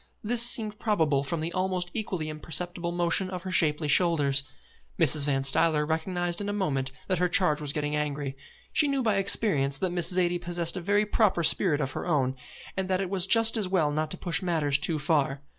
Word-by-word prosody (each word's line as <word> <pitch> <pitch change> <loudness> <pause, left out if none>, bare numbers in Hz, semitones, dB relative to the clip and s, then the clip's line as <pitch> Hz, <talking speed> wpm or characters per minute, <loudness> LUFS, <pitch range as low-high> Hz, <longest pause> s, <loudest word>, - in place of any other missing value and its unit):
This 235 +2 +1
seemed 225 -3 +1
probable 160 -10 0
from 155 +3 -4
the 165 +2 -4
almost 185 -1 -2
equally 185 -7 -4
imperceptible 170 +3 -3
motion 175 +2 0
of 180 -2 -6
her 190 - -6
shapely 150 -3 +1
shoulders. 145 -3 +2 0.6
Mrs. 150 -2 +5
Van 135 -2 0
Stuyler 150 +2 +2
recognised 175 +3 -1
in 205 - -4
a - - -2
moment 135 -10 -2 0.2
that 185 -3 -1
her 180 0 +1
charge 170 -5 +2
was 145 -2 -1
getting 150 0 -3
angry. 145 -2 -3 0.4
She 295 - +3
knew 275 -2 -1
by 215 -4 +1
experience 180 -8 +1
that 185 +4 -2
Miss 175 -1 +2
Zaidie 175 -1 0
possessed 175 -1 -2
a 185 - -4
very 205 +4 +1
proper 205 -5 +1
spirit 160 -1 +4
of 135 - -3
her - - -6
own, 135 -6 0 0.4
and 190 0 -3
that 185 -1 0
it 195 -1 -4
was 190 -1 -2
just 225 +2 +4
as 210 -4 -1
well 170 -6 +1
not 155 +1 -2
to - - -4
push 175 - -2
matters 155 -6 0
too 155 +1 +2
far. 145 -2 -1
170 Hz, 210 wpm, -27 LUFS, 150-190 Hz, 0.6 s, Mrs